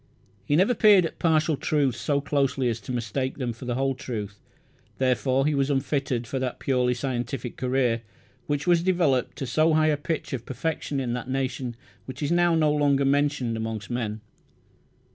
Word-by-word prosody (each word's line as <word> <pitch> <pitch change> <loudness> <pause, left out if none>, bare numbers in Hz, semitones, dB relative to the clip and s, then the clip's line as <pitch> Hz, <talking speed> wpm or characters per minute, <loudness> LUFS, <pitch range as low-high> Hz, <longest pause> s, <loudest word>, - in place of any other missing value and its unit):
He 145 - +1
never 190 +9 +4
peered 210 -5 +6
at - - -6
partial 160 -1 +2
truths 140 -3 0
so 140 -2 0
closely 135 -3 0
as 115 -1 -2
to 105 +4 -8
mistake 125 +2 -2
them 125 -4 -2
for 115 +3 -10
the 120 -1 -2
whole 135 +1 +1
truth; 105 -6 -6 0.6
therefore, 130 +1 +1
he 150 - +2
was 140 0 +1
unfitted 135 -3 -1
for 135 +2 -3
that 130 -1 -3
purely 125 -2 +1
scientific 120 -1 -3
career 125 -3 0 0.5
which 145 0 -1
was 175 -2 +4
developed 170 -9 +1
to 135 - -3
so 155 +5 +2
high 155 0 +4
a 150 - +2
pitch 150 0 -3
of 125 -3 -3
perfection 145 0 -3
in 125 -3 -2
that 125 +1 -5
nation 130 -2 -2 0.3
which 130 +3 -7
is 145 - 0
now 175 -1 +3
no 155 -2 +3
longer 140 -2 +2
mentioned 140 -4 +1
amongst 110 -2 -4
men. 110 -3 -3
135 Hz, 180 wpm, -26 LUFS, 125-150 Hz, 0.6 s, peered